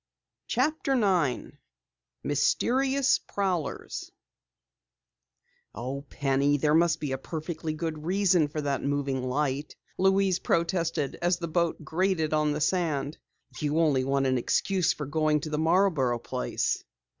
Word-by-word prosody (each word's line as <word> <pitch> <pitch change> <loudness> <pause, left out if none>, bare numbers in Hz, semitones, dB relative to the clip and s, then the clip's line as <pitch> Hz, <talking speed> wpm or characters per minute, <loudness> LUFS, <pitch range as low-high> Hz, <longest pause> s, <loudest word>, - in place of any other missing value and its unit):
CHAPTER 300 -3 0
9 180 - 0 0.6
MYSTERIOUS 265 - +2
PROWLERS 185 -7 -3 1.6
"Oh, 135 +3 -4
Penny, 140 +1 +1
there 150 +1 +2
must 160 0 +3
be 145 -3 -3
a 135 - -2
perfectly 160 +1 -5
good 155 -1 -4
reason 180 -2 +3
for 150 +1 -4
that 140 -2 -1
moving 140 -2 -1
light," 140 +2 -2 0.2
Louise 190 -1 +3
protested 165 -4 0
as 175 0 +2
the 170 -1 -4
boat 170 0 -1
grated 170 -3 0
on 150 -1 +2
the 150 +1 -2
sand. 155 -4 0 0.4
"You 150 0 0
only 150 -6 +3
want 135 +1 +1
an 130 -1 +2
excuse 185 +8 +1
for 150 - -4
going 155 +1 +1
to 155 - -6
the 150 - -1
Marborough 160 -7 +2
place!" - - -2
155 Hz, 130 wpm, -27 LUFS, 145-175 Hz, 1.6 s, must